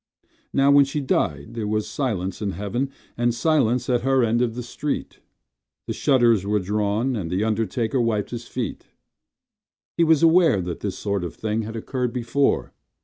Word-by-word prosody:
Now 140 Hz, +1 st, +4 dB
when 140 Hz, 0 st, +7 dB
she 140 Hz, +2 st, -3 dB
died 90 Hz, -, -1 dB
there 115 Hz, -3 st, -3 dB
was 110 Hz, 0 st, -1 dB
silence 100 Hz, -9 st, -2 dB
in 100 Hz, -2 st, -2 dB
heaven 120 Hz, +7 st, -2 dB, 0.3 s
And 120 Hz, 0 st, +1 dB
silence 125 Hz, -5 st, +2 dB
at 125 Hz, -2 st, +1 dB
her 135 Hz, 0 st, +2 dB
end 115 Hz, +1 st, +2 dB
of 115 Hz, -2 st, 0 dB
the 125 Hz, -, -4 dB
street. 135 Hz, +4 st, -4 dB, 0.7 s
The -, -, -3 dB
shutters 120 Hz, -8 st, +3 dB
were 105 Hz, +1 st, +1 dB
drawn 105 Hz, +5 st, 0 dB
and 95 Hz, -7 st, -3 dB
the 95 Hz, +4 st, 0 dB
undertaker 110 Hz, +3 st, 0 dB
wiped 110 Hz, -3 st, 0 dB
his 120 Hz, -1 st, -6 dB
feet— 120 Hz, -6 st, -5 dB, 1.1 s
He 170 Hz, -, +3 dB
was 160 Hz, -1 st, +4 dB
aware 165 Hz, -, +5 dB
that 90 Hz, -1 st, -4 dB
this 95 Hz, -2 st, -4 dB
sort 100 Hz, -3 st, -2 dB
of 85 Hz, -, -5 dB
thing 110 Hz, 0 st, -2 dB
had 110 Hz, +1 st, -6 dB
occurred 125 Hz, +1 st, -3 dB
before. 130 Hz, +3 st, 0 dB
115 Hz, 175 wpm, -23 LUFS, 105-130 Hz, 1.1 s, when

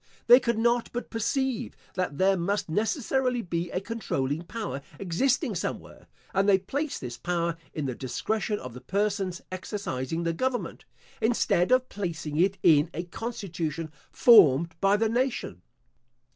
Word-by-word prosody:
They 245 Hz, +2 st, +9 dB
could 235 Hz, -3 st, 0 dB
not 235 Hz, +1 st, +2 dB
but 245 Hz, -, -5 dB
perceive, 260 Hz, +2 st, -1 dB, 0.2 s
that 180 Hz, -6 st, -2 dB
there 190 Hz, +1 st, +4 dB
must 190 Hz, +2 st, -1 dB
necessarily 245 Hz, -, 0 dB
be 170 Hz, 0 st, -2 dB
a 180 Hz, -, -2 dB
controlling 165 Hz, -, -2 dB
power 200 Hz, -5 st, -5 dB, 0.2 s
existing 195 Hz, +9 st, 0 dB
somewhere, -, -, -5 dB, 0.3 s
and 195 Hz, +1 st, +3 dB
they 195 Hz, -, +6 dB
placed 280 Hz, +10 st, -3 dB
this 120 Hz, -1 st, -6 dB
power 170 Hz, -1 st, -1 dB, 0.2 s
in 150 Hz, -, -4 dB
the 130 Hz, -, -2 dB
discretion 210 Hz, -, -2 dB
of 125 Hz, -, -8 dB
the 125 Hz, -, -10 dB
persons 195 Hz, +2 st, -1 dB
exercising 170 Hz, -, -3 dB
the 165 Hz, 0 st, 0 dB
government, 255 Hz, +7 st, -2 dB, 0.4 s
instead 220 Hz, -4 st, +2 dB
of 255 Hz, 0 st, +4 dB
placing 165 Hz, -8 st, -4 dB
it 195 Hz, +2 st, +3 dB
in 155 Hz, -1 st, +5 dB
a 170 Hz, -, -2 dB
constitution 170 Hz, -6 st, -4 dB, 0.2 s
formed 170 Hz, -, +6 dB
by 195 Hz, +1 st, +4 dB
the 225 Hz, +1 st, +2 dB
nation. 235 Hz, -, -1 dB
195 Hz, 145 wpm, -27 LUFS, 165-230 Hz, 0.4 s, They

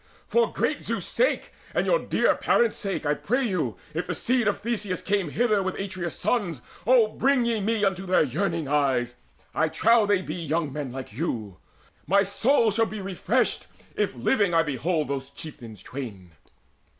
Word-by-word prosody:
For 475 Hz, 0 st, +2 dB
great -, -, -1 dB
Zeus' -, -, -2 dB
sake, -, -, 0 dB, 0.2 s
for -, -, +2 dB
your -, -, +2 dB
dear -, -, +2 dB
parents' 235 Hz, -2 st, +2 dB
sake, 195 Hz, -5 st, -3 dB
I 145 Hz, -, +3 dB
pray 250 Hz, -, 0 dB
you, 160 Hz, -, -1 dB, 0.2 s
if 165 Hz, +3 st, -3 dB
the -, -, -2 dB
seed 245 Hz, -2 st, +1 dB
of 205 Hz, -, +1 dB
Theseus 210 Hz, -5 st, -2 dB
came 195 Hz, -5 st, 0 dB
Hither 215 Hz, +3 st, +2 dB
with 190 Hz, -1 st, -2 dB
Atreus' 185 Hz, -3 st, -4 dB
sons, 175 Hz, -, -1 dB, 0.2 s
O 245 Hz, -3 st, +6 dB
bring 265 Hz, +1 st, +2 dB
ye 230 Hz, -2 st, 0 dB
me 215 Hz, 0 st, +1 dB
Unto 190 Hz, -1 st, -1 dB
their 185 Hz, -, +4 dB
yearning 155 Hz, +2 st, -1 dB
eyes. 135 Hz, -4 st, +1 dB, 0.4 s
I 160 Hz, -, +1 dB
trow 220 Hz, +6 st, +4 dB
they 200 Hz, -2 st, +2 dB
be -, -, -5 dB
Young 160 Hz, -3 st, -2 dB
men 145 Hz, -3 st, -4 dB
like 130 Hz, -4 st, -7 dB
you. 110 Hz, -, -3 dB, 0.5 s
My 195 Hz, +4 st, +4 dB
soul 225 Hz, +3 st, +2 dB
shall 225 Hz, +2 st, +2 dB
be 215 Hz, -, -6 dB
refreshed 195 Hz, +5 st, 0 dB, 0.3 s
If -, -, 0 dB
living 200 Hz, -9 st, +2 dB
I 165 Hz, -, +5 dB
behold 150 Hz, +2 st, -1 dB
those 140 Hz, -1 st, -4 dB
chieftains 120 Hz, -, -10 dB
twain." 105 Hz, -10 st, -7 dB
185 Hz, 175 wpm, -26 LUFS, 145-220 Hz, 0.5 s, O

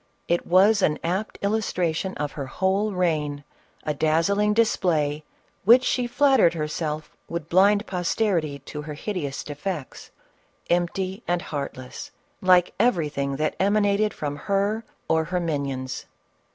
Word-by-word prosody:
It 170 Hz, 0 st, 0 dB
was 195 Hz, +4 st, +5 dB
an 150 Hz, -4 st, +2 dB
apt 190 Hz, +6 st, -2 dB
illustration 190 Hz, -4 st, -1 dB
of 145 Hz, -1 st, -2 dB
her 140 Hz, -3 st, -6 dB
whole 190 Hz, +7 st, 0 dB
reign 155 Hz, -6 st, -1 dB, 0.2 s
— -, -, -34 dB
a 150 Hz, -, -1 dB
dazzling 165 Hz, +8 st, +2 dB
display 160 Hz, -9 st, +1 dB, 0.4 s
which 240 Hz, +6 st, +7 dB
she 250 Hz, -1 st, 0 dB
flattered 260 Hz, -9 st, +4 dB
herself 155 Hz, 0 st, -3 dB
would 170 Hz, -2 st, -5 dB
blind 200 Hz, +4 st, +4 dB
posterity 175 Hz, -4 st, 0 dB
to 150 Hz, -, -6 dB
her 150 Hz, 0 st, -7 dB
hideous 155 Hz, -5 st, -4 dB
defects 150 Hz, 0 st, -6 dB, 0.3 s
— -, -, -37 dB
empty 185 Hz, +3 st, 0 dB
and 175 Hz, 0 st, 0 dB
heartless 140 Hz, -3 st, -6 dB, 0.3 s
like 180 Hz, -1 st, +4 dB
everything 150 Hz, -, +1 dB
that 155 Hz, +2 st, -1 dB
emanated 205 Hz, +1 st, +2 dB
from 145 Hz, -1 st, -4 dB
her 200 Hz, +6 st, 0 dB, 0.2 s
or 160 Hz, 0 st, +2 dB
her 180 Hz, +2 st, -1 dB
minions. 140 Hz, -6 st, -3 dB
175 Hz, 135 wpm, -24 LUFS, 150-200 Hz, 0.4 s, which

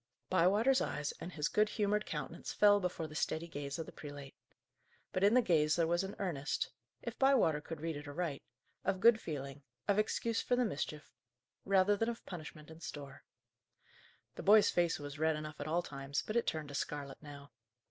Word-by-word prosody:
Bywater's 205 Hz, +9 st, +4 dB
eyes 150 Hz, -1 st, -2 dB
and 180 Hz, -, -6 dB
his 150 Hz, -1 st, 0 dB
good 210 Hz, 0 st, +2 dB
humoured 210 Hz, 0 st, 0 dB
countenance -, -, -5 dB
fell 205 Hz, -1 st, +5 dB
before 180 Hz, -3 st, -2 dB
the 155 Hz, -, -9 dB
steady 160 Hz, +2 st, -1 dB
gaze 145 Hz, -2 st, -5 dB
of 165 Hz, -, -4 dB
the -, -, -10 dB
prelate. 145 Hz, -2 st, -9 dB, 0.8 s
But 185 Hz, -, 0 dB
in 205 Hz, +4 st, +6 dB
the 255 Hz, -, +6 dB
gaze 155 Hz, -5 st, +3 dB
there 170 Hz, -, +3 dB
was 175 Hz, +3 st, +1 dB
an 195 Hz, +1 st, -5 dB
earnest 160 Hz, -7 st, -2 dB, 0.3 s
if -, -, -6 dB
Bywater 255 Hz, -, +4 dB
could 160 Hz, 0 st, -7 dB
read 165 Hz, -1 st, -2 dB
it 145 Hz, 0 st, -7 dB
aright 150 Hz, -1 st, -3 dB, 0.4 s
of 195 Hz, -1 st, 0 dB
good 225 Hz, +1 st, +6 dB
feeling, 140 Hz, -2 st, -5 dB, 0.3 s
of 200 Hz, +1 st, +3 dB
excuse 225 Hz, +1 st, 0 dB
for 250 Hz, -, +1 dB
the 250 Hz, 0 st, +2 dB
mischief, 150 Hz, -, -4 dB, 0.5 s
rather 195 Hz, +1 st, +4 dB
than 225 Hz, +3 st, 0 dB
of 235 Hz, -, -6 dB
punishment 155 Hz, -3 st, -8 dB
in 160 Hz, -, -12 dB
store. 140 Hz, -4 st, -8 dB, 1.1 s
The -, -, -7 dB
boy's 210 Hz, +1 st, +6 dB
face 175 Hz, -1 st, +2 dB
was 145 Hz, 0 st, -7 dB
red 160 Hz, 0 st, +2 dB
enough 155 Hz, 0 st, -6 dB
at 145 Hz, -, -4 dB
all 170 Hz, +3 st, +1 dB
times, 140 Hz, -1 st, -3 dB
but 215 Hz, -, -4 dB
it 235 Hz, -, +2 dB
turned 155 Hz, -2 st, -2 dB
to -, -, -8 dB
scarlet 140 Hz, -1 st, -4 dB
now. 145 Hz, -1 st, -11 dB
165 Hz, 195 wpm, -35 LUFS, 145-205 Hz, 1.1 s, in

